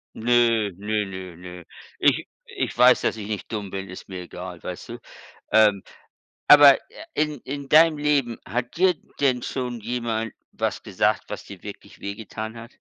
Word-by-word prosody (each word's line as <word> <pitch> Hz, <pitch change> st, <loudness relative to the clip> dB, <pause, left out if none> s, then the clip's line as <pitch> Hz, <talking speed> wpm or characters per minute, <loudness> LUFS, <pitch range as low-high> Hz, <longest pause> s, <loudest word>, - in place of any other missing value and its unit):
Nö, 115 Hz, -2 st, +3 dB
nö, 105 Hz, +1 st, -1 dB
nö, 95 Hz, -2 st, -8 dB
nö. 90 Hz, +1 st, -10 dB, 0.4 s
Ich -, -, +3 dB, 0.2 s
ich -, -, -4 dB
weiß, 125 Hz, +1 st, +6 dB
dass -, -, 0 dB
ich 105 Hz, -1 st, -6 dB
nicht 105 Hz, +1 st, -5 dB
dumm 105 Hz, -3 st, -4 dB
bin, 95 Hz, 0 st, -6 dB
ist 90 Hz, -, -10 dB
mir 90 Hz, -1 st, -6 dB
egal, 90 Hz, 0 st, -9 dB
weißt 90 Hz, -, -7 dB
du? -, -, -6 dB, 0.6 s
Ähm, 105 Hz, -3 st, +5 dB, 0.6 s
aber, 145 Hz, -2 st, +9 dB
äh, 320 Hz, -, -11 dB
in 150 Hz, -4 st, -1 dB
in 140 Hz, 0 st, -6 dB
deinem 155 Hz, 0 st, +6 dB
Leben, 140 Hz, -6 st, +1 dB
hat 125 Hz, +5 st, -3 dB
dir 185 Hz, 0 st, +4 dB, 0.3 s
denn 130 Hz, -3 st, +2 dB
schon 125 Hz, -3 st, -4 dB
jemand 115 Hz, -1 st, -3 dB, 0.2 s
was -, -, -2 dB
gesagt, -, -, 0 dB
was -, -, -6 dB
dir -, -, -12 dB
wirklich -, -, -11 dB
wehgetan 110 Hz, +2 st, -6 dB
hat? 115 Hz, +2 st, -11 dB
115 Hz, 170 wpm, -24 LUFS, 100-130 Hz, 0.6 s, aber